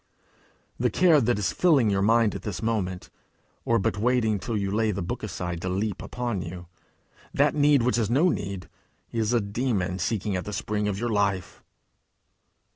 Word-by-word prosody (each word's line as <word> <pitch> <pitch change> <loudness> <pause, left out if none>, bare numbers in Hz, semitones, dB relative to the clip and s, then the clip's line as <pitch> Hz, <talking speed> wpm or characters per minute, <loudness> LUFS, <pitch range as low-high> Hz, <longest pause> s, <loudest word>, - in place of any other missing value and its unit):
The - - +2
care 170 -5 +4
that 120 -2 +1
is 105 - 0
filling 140 - +3
your 95 -1 +1
mind 115 +1 +3
at - - -6
this 100 -4 -5
moment, 95 -5 -2 0.5
or 115 - +3
but 100 0 -1
waiting 110 -2 +2
till 110 +3 -3
you 100 -1 -2
lay 110 +1 +1
the 100 -3 -2
book - - -4
aside 85 -2 -4
to 95 - -3
leap 100 +1 -2
upon 120 -6 -3
you 90 +1 -7 0.7
that 145 +1 +3
need 145 -3 +4
which 125 0 +2
is 110 -3 0
no 145 +9 +4
need, 100 - -4 0.4
is 115 -1 0
a 120 - +3
demon 100 -4 -1
sucking 100 +2 -1
at 90 - -3
the 105 - -5
spring 105 0 -2
of 100 -2 -1
your 120 +3 -2
life. 100 -5 -1
105 Hz, 185 wpm, -26 LUFS, 95-120 Hz, 0.7 s, care